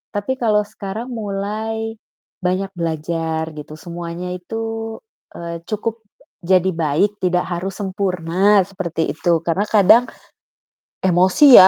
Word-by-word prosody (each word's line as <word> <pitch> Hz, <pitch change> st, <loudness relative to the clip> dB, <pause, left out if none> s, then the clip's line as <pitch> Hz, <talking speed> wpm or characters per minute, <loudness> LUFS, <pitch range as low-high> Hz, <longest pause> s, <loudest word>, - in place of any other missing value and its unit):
tapi 205 Hz, +6 st, -1 dB
kalau 220 Hz, -5 st, +3 dB
sekarang 215 Hz, +2 st, -6 dB
mulai 220 Hz, 0 st, -3 dB, 0.5 s
banyak 185 Hz, +2 st, +1 dB
belajar 160 Hz, -1 st, -2 dB
gitu. 150 Hz, 0 st, -8 dB
Semuanya 175 Hz, +1 st, -5 dB
itu, 225 Hz, +4 st, -4 dB, 0.4 s
eee, 170 Hz, -1 st, -6 dB
cukup 225 Hz, +1 st, -2 dB, 0.4 s
jadi 185 Hz, +1 st, +4 dB
baik 165 Hz, +6 st, +1 dB
tidak 180 Hz, -1 st, +2 dB
harus 185 Hz, +2 st, -3 dB
sempurna, 190 Hz, 0 st, +2 dB
seperti 175 Hz, -5 st, -2 dB
itu. 170 Hz, 0 st, +2 dB
Karena 175 Hz, +4 st, +1 dB
kadang 215 Hz, +3 st, +7 dB, 1.0 s
emosi 190 Hz, -, +7 dB
ya, 185 Hz, -, +11 dB
190 Hz, 115 wpm, -20 LUFS, 170-215 Hz, 1.0 s, ya